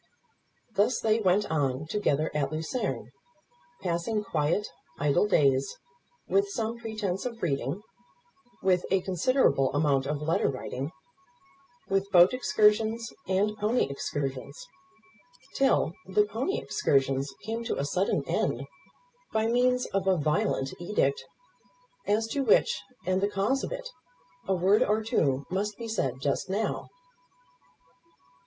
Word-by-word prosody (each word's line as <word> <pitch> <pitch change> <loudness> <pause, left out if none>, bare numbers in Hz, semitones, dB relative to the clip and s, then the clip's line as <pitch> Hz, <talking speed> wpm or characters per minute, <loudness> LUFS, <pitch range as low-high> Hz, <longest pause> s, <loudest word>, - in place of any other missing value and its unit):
Thus 210 +5 +2
they 220 0 +2
went 200 0 +3
on 140 -2 0
together 155 -4 0
at 145 -2 -1
Lucerne, 160 +11 -3 0.7
passing 175 +6 -1
quiet, 165 +3 0 0.3
idle 150 +7 +2
days, 140 -7 +2 0.5
with 400 0 +2
some 230 - -3
pretence 215 -5 -3
of 235 -2 -6
reading, 140 - -1 0.8
with 185 -2 +3
a 190 0 +2
considerable 180 - +2
amount 140 -2 +2
of 150 0 -1
letter 160 +2 +1
writing, 135 +2 -4 1.0
with 195 0 0
boat 180 +1 +6
excursions 220 -2 +2
and 200 +3 +1
pony 220 +4 +2
excursions, 140 - -4 0.9
till 270 -11 +2
the 205 +2 +3
pony 230 - -2
excursions 135 - +1
came 225 +2 -3
to - - -2
a 140 - -1
sudden 185 +7 0
end - - 0 0.7
by 220 0 +1
means 250 +2 +2
of 195 -1 0
a 190 -1 +4
violent 150 -2 0
edict, 175 -7 0 0.8
as 215 +2 +2
to 280 - -1
which, 210 -3 +3 0.2
and 185 +1 +1
the 200 - +2
cause 205 +7 0
of - - -4
it, - - -5 0.6
a 190 - +2
word 190 +4 +3
or 215 +2 +2
two 140 -10 +1
must 205 +2 -2
be 230 - -6
said 135 - -1
just 140 +5 -1
now. 205 +3 -2
195 Hz, 130 wpm, -28 LUFS, 150-220 Hz, 1.0 s, boat